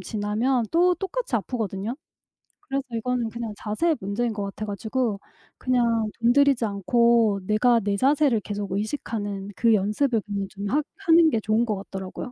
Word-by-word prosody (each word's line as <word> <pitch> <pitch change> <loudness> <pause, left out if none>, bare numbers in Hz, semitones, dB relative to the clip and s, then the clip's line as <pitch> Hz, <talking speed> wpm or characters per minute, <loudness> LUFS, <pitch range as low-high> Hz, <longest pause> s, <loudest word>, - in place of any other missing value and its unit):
지나면 225 +4 0
또 355 +2 +4
똑같이 385 - -4
아프거든요. 215 -1 -3 0.7
그래서 275 0 -2
이거는 240 0 -1
그냥 230 -1 -5
자세의 300 +12 0
문제인 215 +4 -2
것 210 -1 -4
같아 200 +2 -5
가지고 215 +1 -2 0.4
그냥 235 -3 +1
돈 235 +1 +4
들이지 280 -3 +4
않고 220 +1 +2
내가 220 +4 +3
내 200 0 0
자세를 275 -1 +3
계속 205 -1 -5
의식하는 205 -2 -3
그 230 +2 +3
연습을 215 +4 +1
그냥 200 -2 -3
좀 200 +1 -6
하 295 +7 +2 0.2
하는 330 -1 +6
게 230 - 0
좋은 215 +2 +1
것 215 -3 -1
같더라고요. 190 +3 -7
225 Hz, 345 characters per minute, -24 LUFS, 205-255 Hz, 0.7 s, 하는